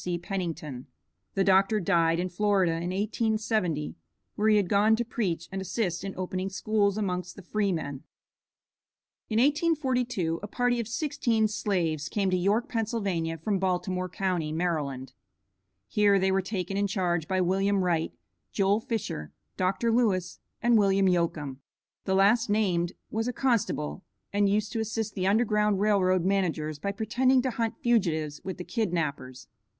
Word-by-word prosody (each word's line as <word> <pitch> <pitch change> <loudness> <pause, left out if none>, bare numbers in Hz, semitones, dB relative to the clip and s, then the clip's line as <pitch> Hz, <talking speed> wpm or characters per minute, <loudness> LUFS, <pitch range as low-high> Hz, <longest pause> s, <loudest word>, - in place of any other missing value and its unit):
C. 175 -1 -1
Pennington." 170 -7 -5 0.5
The 195 - +3
Dr. 195 +3 +4
died 165 -2 +2
in 180 - 0
Florida, 195 -1 +2
in 165 +2 -2
1870, 215 -5 -1 0.4
where 215 +1 +2
he 215 - +5
had 200 -3 +2
gone 210 +3 +4
to 240 +1 -2
preach 180 -8 -2
and 195 0 -3
assist 190 -2 -2
in 195 -1 -5
opening 185 +1 -3
schools 200 +1 +1
amongst 180 -3 -2
the 195 - -11
Freemen. 170 -9 -2 1.3
In 220 - 0
1842 255 - +1
a 210 - -5
party 245 +3 0
of 230 - -3
sixteen 235 -4 0
slaves 170 -8 -1
came 195 -3 0
to - - +3
York, 200 +6 +1
Pa., 225 -2 -1 0.6
from 200 -1 0
Baltimore 185 0 -1
county, 180 -4 -1
Md. 150 -6 -2 0.8
Here 205 - +3
they 190 0 +2
were 195 0 +2
taken 190 -1 -3
in 200 0 +1
charge 175 -4 -1
by 190 0 0
William 195 +2 +2
Wright, 165 -3 0 0.4
Joel 200 +1 +2
Fisher, 220 - -4 0.2
Dr. 195 +5 0
Lewis, 195 -7 +1 0.2
and 235 -2 +5
William 195 -1 +3
Yocum. 160 -6 0 0.5
The 190 - +1
last 210 +4 +4
named 185 -4 +1 0.2
was 225 +2 -1
a 250 - -1
constable, 225 - -1 0.3
and 205 0 +3
used 210 +2 0
to 230 - -2
assist 220 -1 -2
the 185 -1 -1
Underground 210 -1 +2
Rail 205 -1 +3
Road 185 -1 +2
managers 165 -6 0
by 200 - -2
pretending 245 +5 +2
to 260 - 0
hunt 230 -1 -2
fugitives 165 - +1
with 190 -2 -5
the 180 - -5
kidnappers. 155 - -3
195 Hz, 155 wpm, -28 LUFS, 175-215 Hz, 1.3 s, he